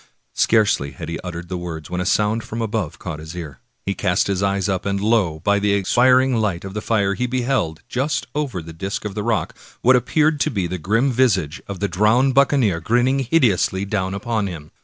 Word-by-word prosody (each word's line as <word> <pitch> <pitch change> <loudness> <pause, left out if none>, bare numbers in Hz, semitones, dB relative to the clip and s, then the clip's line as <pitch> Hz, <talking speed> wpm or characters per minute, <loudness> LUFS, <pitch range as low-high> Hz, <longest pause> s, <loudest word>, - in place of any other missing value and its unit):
Scarcely 105 - +2
had - - -7
he 85 - -4
uttered 85 -1 -7
the 90 0 -4
words 80 -3 -7
when 90 0 -1
a 90 - -2
sound 105 +3 +1
from 115 - -6
above 110 -7 -2
caught 80 -4 -6
his 80 +2 -9
ear. 75 -7 -7 0.3
He 100 - 0
cast 90 -2 +1
up - - -4
his 95 -1 -1
eyes, 100 0 0
and 100 +1 -1
lo! 100 -7 +1
by 100 0 +3
the 100 0 +1
expiring 125 +5 +3
light 100 -5 -1
of 95 - -7
the 105 - -3
fire 100 -3 +1
he 125 +5 -1
beheld, 125 -10 -1
just 135 +5 -1
over 135 - -3
the 80 0 -10
disk 95 +6 -4
of 105 - -3
the 105 - -3
rock, 110 0 -1 0.3
what 130 +2 +6
appeared 150 +4 +2
to - - +1
be 95 -4 -1
the 90 +1 -4
grim 115 - +1
visage 95 - +1
of 100 -3 -6
the 100 - +1
drowned 110 +9 +3
buccaneer, 130 - +3
grinning 120 +9 +2
hideously 115 - +2
down 95 -2 -2
upon 105 0 -1
him. 80 -5 -8
100 Hz, 215 wpm, -21 LUFS, 90-120 Hz, 0.3 s, what